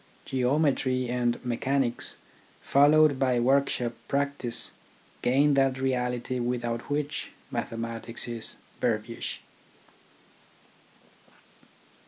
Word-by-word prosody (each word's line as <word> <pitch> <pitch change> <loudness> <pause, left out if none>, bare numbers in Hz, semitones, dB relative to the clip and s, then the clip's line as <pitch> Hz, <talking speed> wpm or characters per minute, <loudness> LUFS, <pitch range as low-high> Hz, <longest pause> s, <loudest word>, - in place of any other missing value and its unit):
Geometry 130 -1 +1
and 120 -1 +1
mechanics, 125 +1 -1 0.5
followed 145 0 +5
by 130 -3 +2
workshop 125 -1 +2
practice, 140 -4 -1 0.5
gain 140 +4 +4
that 135 -1 +3
reality 125 -1 -1
without 120 0 -2
which 145 0 -2 0.2
mathe - - -2
matics 115 +1 -4
is 115 -2 -4 0.2
verbiage. - - -2
130 Hz, 80 wpm, -28 LUFS, 120-140 Hz, 0.5 s, followed